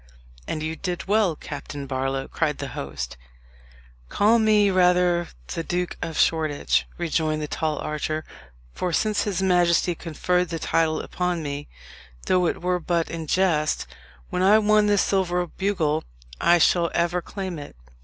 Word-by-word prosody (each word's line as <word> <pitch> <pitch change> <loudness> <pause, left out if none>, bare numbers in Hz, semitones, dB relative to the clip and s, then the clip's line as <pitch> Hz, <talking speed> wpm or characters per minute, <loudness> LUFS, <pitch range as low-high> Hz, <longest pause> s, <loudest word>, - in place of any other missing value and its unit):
"And 155 - -3
you 160 +1 -2
did 180 0 -4
well, 205 -5 +3
Captain 145 -1 -7
Barlow," 135 0 -2
cried 155 -3 -1
the 140 - -5
host. 65 - -6 0.9
"Call 220 +3 +4
me 210 -2 +4
rather 180 -1 +3 0.3
the 165 - -3
Duke 180 +1 -2
of 160 - -4
Shoreditch," 155 -3 +1
rejoined 160 -2 0
the 150 - -3
tall 155 0 -2
archer; 155 +1 -3 0.5
"for 180 - -2
since 215 +3 +1
his 190 -2 -1
majesty 175 -1 +3
conferred 180 +2 -1
the 165 - -3
title 160 0 +1
upon 180 -2 -2
me, 145 0 -5 0.6
though 180 -1 +3
it - - -3
were 180 0 +1
but 170 -1 -1
in 165 -1 -5
jest, 160 -4 +1 0.5
when 180 - -1
I 200 +3 +6
won 215 -1 +4
this 205 -1 +3
silver 180 -2 +1
bugle, 170 -4 -1 0.4
I 175 - +5
shall 170 +1 +3
ever 175 +1 +1
claim 185 -3 -5
it. 145 - -10
175 Hz, 155 wpm, -24 LUFS, 155-185 Hz, 0.9 s, I